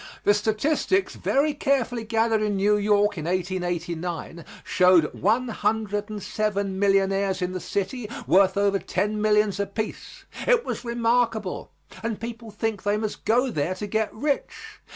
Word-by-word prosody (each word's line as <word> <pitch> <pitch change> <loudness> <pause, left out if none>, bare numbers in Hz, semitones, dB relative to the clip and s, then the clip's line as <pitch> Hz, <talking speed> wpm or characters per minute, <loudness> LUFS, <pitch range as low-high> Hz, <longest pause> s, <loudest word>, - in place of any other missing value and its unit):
The 205 - +5
statistics 275 - +1
very 290 +2 +1
carefully 260 -5 0
gathered 225 0 +1
in 210 -1 0
New 205 +2 +3
York 205 -2 +2
in 155 - -5
1889 175 -2 -3 0.2
showed 180 -4 +4
one 235 +5 +1
hundred 215 -1 -1
and 210 -2 -6
seven 200 -3 -1
millionaires 195 -1 +2
in 180 -1 -2
the 185 - -4
city 210 +5 -3 0.2
worth 190 +1 +4
over 200 -1 +2
ten 210 +4 -1
millions 210 -2 +2
apiece. 200 +2 -5 0.2
It - - +4
was - - -4
remarkable 235 -1 0 0.3
and 225 -2 -3
people 230 0 -7
think 210 0 -3
they 205 +1 +1
must 215 -1 -4
go 245 +3 +2
there 160 +1 -1
to 210 - -5
get 220 +1 -1
rich. 300 - -3
210 Hz, 150 wpm, -25 LUFS, 195-230 Hz, 0.3 s, The